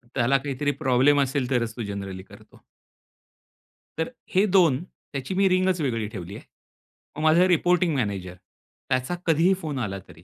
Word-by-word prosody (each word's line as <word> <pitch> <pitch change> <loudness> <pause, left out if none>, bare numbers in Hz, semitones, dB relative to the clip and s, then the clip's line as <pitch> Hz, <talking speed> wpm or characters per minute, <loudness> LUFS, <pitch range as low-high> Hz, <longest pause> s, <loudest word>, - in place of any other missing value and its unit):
त्याला 130 +4 +3
काहीतरी 140 +1 -2
प्रॉब्लेम 135 +2 +4
असेल, 135 -2 -1
तरच 115 -4 -1
तो 120 - -4
जनरली 100 -2 -6
करतो. - - -18 1.4
तर 160 - -1 0.3
हे 195 +3 +5
2 160 -5 +3
त्याची 140 -4 -8
मी 195 +1 +3
रिंग 185 0 +2
वेगळी 115 -7 -1
ठेवली 100 -3 -8
आहे. - - -10 0.7
मग 155 - -4
माझा 165 +4 +5
रिपोर्टिंग 180 -1 +2
मॅनेजर, 100 -7 -3 0.5
त्याचा 130 +6 0
कधी 165 +1 +3
ही 190 - +5
फोन 150 -5 -4
आला, 100 -5 -3
तरी 85 -2 -16
135 Hz, 160 wpm, -25 LUFS, 110-160 Hz, 1.4 s, हे